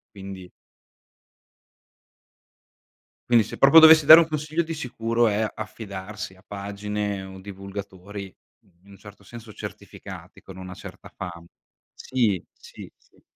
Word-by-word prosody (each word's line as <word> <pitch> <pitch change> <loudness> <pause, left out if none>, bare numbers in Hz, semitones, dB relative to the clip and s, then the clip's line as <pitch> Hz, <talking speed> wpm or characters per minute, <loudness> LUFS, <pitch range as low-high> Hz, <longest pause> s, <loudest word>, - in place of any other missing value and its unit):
Quindi 95 -2 -9 2.8
quindi 115 -2 +5
se - - -9
proprio 140 +4 +7
dovessi 160 -2 +8
dare 160 +2 +11
un 165 - +1
consiglio 155 +1 -2
di 165 - -6
sicuro 115 -5 0
è: 110 +1 0
"Affidarsi 105 -1 -8
a 95 - -22
pagine 100 0 -4
o 95 0 -11
divulgatori, 100 0 -9 0.5
in 100 - -17
un 100 - -14
certo 105 0 -15
senso 110 +2 -12
certificati, - - -10
con 95 - -13
una 95 -1 -9
certa 95 0 -11
fama." 85 -3 -8 0.5
Sì, 110 -8 -1
sì, - - -13
sì. - - -30
105 Hz, 125 wpm, -24 LUFS, 95-115 Hz, 2.8 s, dare